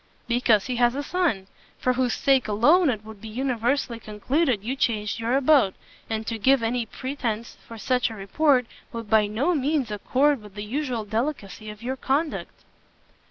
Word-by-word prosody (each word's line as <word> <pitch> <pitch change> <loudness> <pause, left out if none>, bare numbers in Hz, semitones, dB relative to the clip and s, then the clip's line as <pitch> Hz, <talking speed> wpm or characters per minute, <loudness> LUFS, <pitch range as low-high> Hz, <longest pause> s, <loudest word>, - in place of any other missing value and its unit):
"Because 235 -4 +3
he 250 -2 -2
has 240 +1 +3
a 285 - -2
son; 305 - 0 0.3
for 255 - +1
whose 250 -1 0
sake 270 -3 +2
alone 285 - +4
it 215 -4 -2
would 220 -2 -11
be 225 - -8
universally 245 +1 -1
concluded 230 +3 0
you 250 +5 -2
changed 210 -6 -1
your 235 +3 +1
abode: 275 -8 +4 0.3
and 220 0 -2
to 225 0 -3
give 260 +2 +4
any 230 0 -1
pretence 235 -3 -4
for 230 - -9
such 250 +2 +1
a 225 - -8
report, 250 +6 +2 0.3
would 230 -3 -7
by 215 -1 +5
no 255 +12 0
means 285 -5 0
accord 260 +6 +1
with 210 -1 -14
the 205 - -5
usual 250 -2 -2
delicacy 220 -2 -3
of 210 +1 -10
your 260 +2 -3
conduct." 290 +5 -2
240 Hz, 175 wpm, -25 LUFS, 215-270 Hz, 0.3 s, by